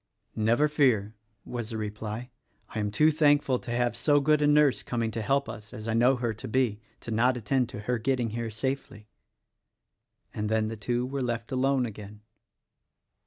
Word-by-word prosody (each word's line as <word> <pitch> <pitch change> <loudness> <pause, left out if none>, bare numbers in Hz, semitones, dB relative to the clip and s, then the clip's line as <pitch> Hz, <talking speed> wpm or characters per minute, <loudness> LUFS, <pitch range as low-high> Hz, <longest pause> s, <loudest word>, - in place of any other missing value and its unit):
"Never 115 +7 +3
fear," 125 -9 +2 0.3
was 120 -3 -5
the 110 - -4
reply; 110 +3 -5 0.4
"I 110 - -5
am 105 -1 0
too 155 +9 +4
thankful 145 -4 +3
to - - -10
have 120 0 0
so 145 +4 +3
good 150 +1 +3
a 145 - +4
nurse 145 -2 +4
coming 115 -2 -2
to 115 0 -3
help 140 +6 +1
us 105 +1 -9
as 110 +1 -7
I 110 - 0
know 120 +4 +4
her 120 -3 -2
to 110 - -8
be, 115 -3 +1 0.2
to 115 - -6
not 125 +3 +2
attend 120 +2 0
to 105 - -7
her 120 +3 -1
getting 125 -1 0
here 115 0 -3
safely." 110 -2 -4 1.2
And 105 0 -2
then 110 0 +1
the 115 - -5
two 120 +3 -1
were 135 +1 -3
left 120 0 -3
alone 130 0 +2
again. 105 -1 -9
120 Hz, 185 wpm, -28 LUFS, 110-135 Hz, 1.2 s, too